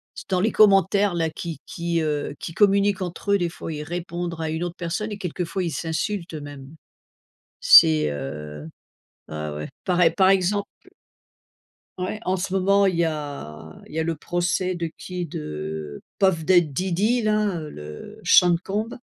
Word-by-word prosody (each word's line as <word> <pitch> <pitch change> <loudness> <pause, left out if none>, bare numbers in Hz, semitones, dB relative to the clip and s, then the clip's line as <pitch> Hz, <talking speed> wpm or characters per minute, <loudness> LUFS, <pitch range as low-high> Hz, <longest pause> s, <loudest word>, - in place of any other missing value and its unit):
c'est - - -10
dans 185 -2 +1
les 220 +3 +2
commentaires 200 -1 +4
là, 165 -1 0
qui 165 -1 -6
qui, 170 -1 -2
heu, 150 -2 -2
qui 165 - -6
communiquent 200 0 +3
entre 185 +3 -3
eux 200 - +5
des 175 -1 0
fois 165 -1 -7
ils 150 - -5
répondre 170 +1 -5
à 160 - -2
une 160 +2 -2
autre 175 -1 -4
personne 180 +5 -3
et 205 - -4
quelquefois 180 0 -3
ils 170 - -2
s'insultent, 165 +4 -3
heu, - - -4
même. 145 -2 -9 0.9
C'est, 75 -1 +7
heu, 75 +2 -6 0.6
ah 75 -1 -5
ouais 75 0 -5 0.2
par 180 -1 0
ex 165 -1 +4
par 190 -1 +5
exemple. 195 +1 +2 1.3
Ouais 185 +4 -3
en 185 +1 +1
ce 185 +1 -4
moment 200 +1 +3
il 185 -3 +1
y 170 - +3
a 140 - -5 0.2
il - - -12
y - - -2
a - - +2
le 165 0 -2
procès 180 +3 -1
de 170 -2 -3
qui 180 -1 -5
de 75 - -6 0.2
Puff 190 -5 +2
Da 180 +1 +6
Diddy 185 - 0
là, 210 -4 +1
heu, 155 -2 -7
le 75 - -10
Sean 175 -1 +6
Combs 215 +5 -3
170 Hz, 180 wpm, -23 LUFS, 150-190 Hz, 1.3 s, C'est